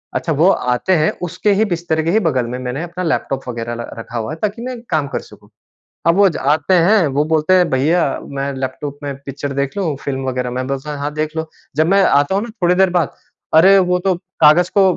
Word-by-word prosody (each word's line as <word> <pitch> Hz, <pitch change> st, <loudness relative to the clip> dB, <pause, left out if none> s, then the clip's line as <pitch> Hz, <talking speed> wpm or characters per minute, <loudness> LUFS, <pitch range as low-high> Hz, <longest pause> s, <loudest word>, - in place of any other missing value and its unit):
अच्छा 165 Hz, -, -1 dB
वो 160 Hz, +6 st, +4 dB
आते 125 Hz, +8 st, 0 dB
हैं 155 Hz, 0 st, +2 dB
उसके 180 Hz, +4 st, 0 dB
ही 210 Hz, +3 st, +2 dB
बिस्तर 170 Hz, -2 st, -1 dB
के 165 Hz, -, 0 dB
ही 215 Hz, -, +3 dB
बगल 135 Hz, -, 0 dB
में 125 Hz, -, -3 dB
मैंने 130 Hz, +4 st, -4 dB
अपना 175 Hz, +1 st, -5 dB
लैपटॉप 135 Hz, -5 st, -1 dB
वगैरह 120 Hz, -1 st, -4 dB
र 120 Hz, -, -5 dB
रखा 115 Hz, +1 st, -7 dB
हुआ 115 Hz, +4 st, -3 dB
है -, -, -7 dB
ताकि 210 Hz, +2 st, -2 dB
मैं 250 Hz, 0 st, -5 dB
काम 150 Hz, -3 st, 0 dB
कर -, -, -3 dB
सकूँ। -, -, -17 dB, 0.6 s
अब 170 Hz, -, +5 dB
वो 200 Hz, 0 st, +6 dB
ज 170 Hz, -, -4 dB
आते 150 Hz, +6 st, +2 dB
हैं 180 Hz, +1 st, +4 dB
वो 145 Hz, +1 st, 0 dB
बोलते 155 Hz, +3 st, +2 dB
हैं, 180 Hz, -2 st, +4 dB
"भईया 155 Hz, +7 st, +2 dB, 0.3 s
मैं 140 Hz, +1 st, -2 dB
लैपटॉप 135 Hz, +2 st, -5 dB
में 140 Hz, -1 st, -4 dB
पिक्चर 140 Hz, +1 st, -5 dB
देख 140 Hz, 0 st, -2 dB
लूँ 170 Hz, -8 st, -1 dB
फ़िल्म 135 Hz, -1 st, -3 dB
वगैरह?" 125 Hz, -1 st, -2 dB
मैं 130 Hz, +1 st, -3 dB
बोलता 135 Hz, +2 st, -4 dB
हूँ, 145 Hz, -, -6 dB
हाँ 145 Hz, +1 st, -3 dB
देख 155 Hz, +1 st, -3 dB
लो। 160 Hz, 0 st, -3 dB, 0.3 s
जब 155 Hz, +1 st, +3 dB
मैं 195 Hz, +1 st, +4 dB
आता 145 Hz, +1 st, +3 dB
हूँ 200 Hz, -, +1 dB
ना 235 Hz, -, -5 dB
थोड़ी 175 Hz, +1 st, +4 dB
देर 190 Hz, 0 st, +3 dB
बाद 175 Hz, -4 st, 0 dB, 0.4 s
अरे 190 Hz, +5 st, +7 dB
वो 180 Hz, -1 st, +2 dB
तो 190 Hz, -1 st, +2 dB, 0.3 s
कागज 160 Hz, +4 st, +6 dB
को -, -, +7 dB
155 Hz, 240 wpm, -18 LUFS, 135-180 Hz, 0.6 s, अरे